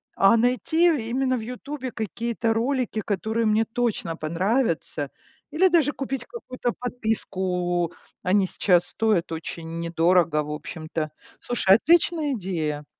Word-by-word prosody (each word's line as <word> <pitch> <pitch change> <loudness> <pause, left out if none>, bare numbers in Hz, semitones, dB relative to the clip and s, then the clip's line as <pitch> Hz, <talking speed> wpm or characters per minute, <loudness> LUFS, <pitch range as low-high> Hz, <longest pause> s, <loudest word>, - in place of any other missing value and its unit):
А 195 +4 +5
найти 255 +8 +2 0.2
именно 260 +1 +1
в - - -4
"Ютубе" 255 +3 -6
какие-то 230 +1 -2
ролики, 240 -1 0
которые 220 +3 -1
мне 215 +1 +3
точно 225 -8 -2
понравятся, 165 - -1 0.4
или 340 +6 +4
даже 325 -5 +3
купить 270 -3 -4
какую-то 255 - -4
подписку. 185 -8 -1 0.3
Они 190 +1 +3
сейчас 180 -2 +3
стоят 215 -6 +1
очень 165 0 -6
недорого, 170 -1 +2
в 150 - -6
общем-то. 155 0 -5 0.3
Слушай, 195 -5 +4
отличная 320 +2 +3
идея! 160 - -3
220 Hz, 120 wpm, -25 LUFS, 170-250 Hz, 0.4 s, А